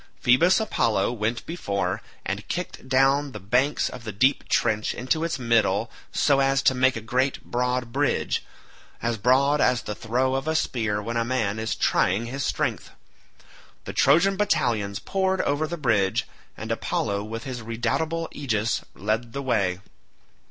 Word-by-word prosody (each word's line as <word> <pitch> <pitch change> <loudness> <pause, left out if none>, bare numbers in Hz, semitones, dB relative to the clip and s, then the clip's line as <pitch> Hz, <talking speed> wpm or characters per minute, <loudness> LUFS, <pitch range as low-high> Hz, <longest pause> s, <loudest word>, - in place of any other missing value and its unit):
Phoebus 165 - +4
Apollo 115 - +1
went 115 0 -2
before, 100 - -2 0.2
and - - -4
kicked 130 - -5
down 135 +1 +3
the - - -6
banks 125 +9 +1
of 125 - -8
the 110 - -5
deep 130 +8 +1
trench 110 -2 +1
into 145 +6 -1
its 165 -4 -1
middle 115 -3 +1 0.2
so 140 -1 +3
as 135 0 +2
to - - +5
make 130 0 +3
a 115 - -4
great 130 +4 -1
broad 125 0 -1
bridge, 140 +3 0 0.6
as 115 -2 -1
broad 135 +6 +3
as 125 -1 +2
the 105 - -4
throw 125 +5 0
of 135 +3 -2
a 160 - 0
spear 110 -8 0
when 115 +2 -3
a 115 - +2
man 115 -4 -1
is 110 0 -2
trying 100 +6 +1
his 135 +3 -4
strength. - - -1 1.0
The - - -6
Trojan 195 +4 +4
battalions 120 - +1
poured 190 -1 -1
over 145 +2 0
the 170 +2 -4
bridge, 110 -9 +1 0.3
and - - -5
Apollo 100 0 -1
with 115 +2 -6
his 130 -3 -5
redoubtable 120 +9 -1
aegis 110 -6 -1
led 110 +4 -2
the 140 - -4
way. 100 -8 0
125 Hz, 160 wpm, -25 LUFS, 110-140 Hz, 1.0 s, to